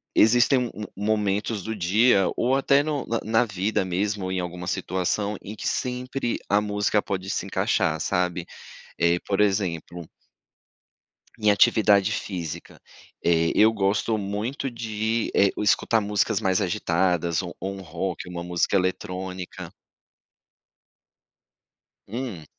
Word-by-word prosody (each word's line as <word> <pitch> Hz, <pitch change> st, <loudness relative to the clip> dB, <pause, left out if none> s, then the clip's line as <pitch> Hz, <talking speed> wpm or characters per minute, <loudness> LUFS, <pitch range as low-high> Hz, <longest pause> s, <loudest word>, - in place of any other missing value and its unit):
existem, 120 Hz, +3 st, +4 dB
hum, 105 Hz, -, -7 dB
momentos 105 Hz, +1 st, 0 dB
do 110 Hz, 0 st, -4 dB
dia, 100 Hz, +2 st, +3 dB
ou 130 Hz, +2 st, +2 dB
até 140 Hz, +1 st, +4 dB
no 150 Hz, -3 st, -2 dB
na 115 Hz, 0 st, -1 dB
na 110 Hz, +2 st, +2 dB
vida 100 Hz, 0 st, -1 dB
mesmo, 95 Hz, +1 st, -2 dB
em 95 Hz, -, -1 dB
alguma 90 Hz, 0 st, -5 dB
situação, 95 Hz, +3 st, -1 dB
em 105 Hz, -, -8 dB
que -, -, -5 dB
sempre 125 Hz, 0 st, -2 dB
a 105 Hz, +1 st, +4 dB
música 105 Hz, 0 st, +1 dB
pode 95 Hz, -1 st, -4 dB
se -, -, -2 dB
encaixar, 80 Hz, 0 st, 0 dB
sabe? 90 Hz, -1 st, -1 dB, 0.5 s
Eh, 85 Hz, +1 st, +3 dB
por 100 Hz, 0 st, -2 dB
exemplo 90 Hz, -4 st, -1 dB, 1.3 s
em 105 Hz, -1 st, +3 dB
atividade 100 Hz, -1 st, +4 dB
física. 85 Hz, -6 st, -5 dB, 0.4 s
Eh, 85 Hz, -1 st, +3 dB
eu 110 Hz, +1 st, +5 dB
gosto 110 Hz, +2 st, +1 dB
muito 105 Hz, +7 st, -3 dB
de, 110 Hz, -1 st, -2 dB
eh, 100 Hz, -1 st, +5 dB
escutar 110 Hz, +2 st, +2 dB
músicas 105 Hz, +1 st, +1 dB
mais 95 Hz, -1 st, +1 dB
agitadas, 85 Hz, -2 st, +1 dB
ou 90 Hz, -2 st, -7 dB
ou 95 Hz, +1 st, -3 dB
um 95 Hz, -, -8 dB
rock, 90 Hz, 0 st, -4 dB
uma 85 Hz, -1 st, -5 dB
música 90 Hz, +2 st, 0 dB
eletrônica. 95 Hz, 0 st, -3 dB, 2.4 s
Hum. 110 Hz, -, -5 dB
100 Hz, 130 wpm, -25 LUFS, 90-110 Hz, 2.4 s, eu